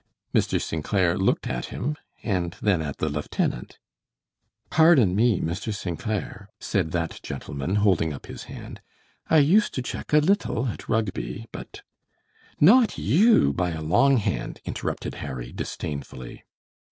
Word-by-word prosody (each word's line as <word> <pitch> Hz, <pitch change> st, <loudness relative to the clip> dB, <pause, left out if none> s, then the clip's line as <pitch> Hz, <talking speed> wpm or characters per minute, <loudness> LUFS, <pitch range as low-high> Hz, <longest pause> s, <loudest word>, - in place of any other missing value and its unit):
Mr. -, -, +2 dB
St. 80 Hz, -2 st, -3 dB
Clair 90 Hz, -2 st, +2 dB
looked 95 Hz, -, +1 dB
at 60 Hz, -1 st, -3 dB
him 150 Hz, +4 st, -3 dB, 0.3 s
and 90 Hz, -5 st, -1 dB
then 95 Hz, -6 st, +2 dB
at 75 Hz, -3 st, -4 dB
the 80 Hz, -, -1 dB
lieutenant. 75 Hz, -4 st, -2 dB, 0.9 s
"Pardon 150 Hz, -, +5 dB
me, 110 Hz, -2 st, +3 dB
Mr. 90 Hz, +7 st, -3 dB
St. 90 Hz, -5 st, -4 dB
Clair," 105 Hz, -1 st, -4 dB
said 80 Hz, -, -1 dB
that 85 Hz, -1 st, -2 dB
gentleman, 70 Hz, +5 st, -4 dB
holding 95 Hz, -6 st, +2 dB
up 70 Hz, -, -8 dB
his -, -, -9 dB
hand. -, -, -9 dB, 0.5 s
"I 160 Hz, -, +5 dB
used 170 Hz, +9 st, +4 dB
to 130 Hz, -, -2 dB
check -, -, -6 dB
a 150 Hz, -, +6 dB
little 150 Hz, -, +2 dB
at -, -, -8 dB
Rugby, 95 Hz, -, -2 dB
but -, -, -9 dB, 0.4 s
" -, -, -32 dB
"Not 245 Hz, -2 st, +4 dB
you, 195 Hz, -, +4 dB
by 90 Hz, +2 st, 0 dB
a 80 Hz, -, -5 dB
long 135 Hz, -, +4 dB
hand," 105 Hz, -, -2 dB
interrupted -, -, -4 dB
Harry, -, -, -6 dB
disdainfully. 70 Hz, -4 st, -6 dB
95 Hz, 150 wpm, -25 LUFS, 80-125 Hz, 0.9 s, a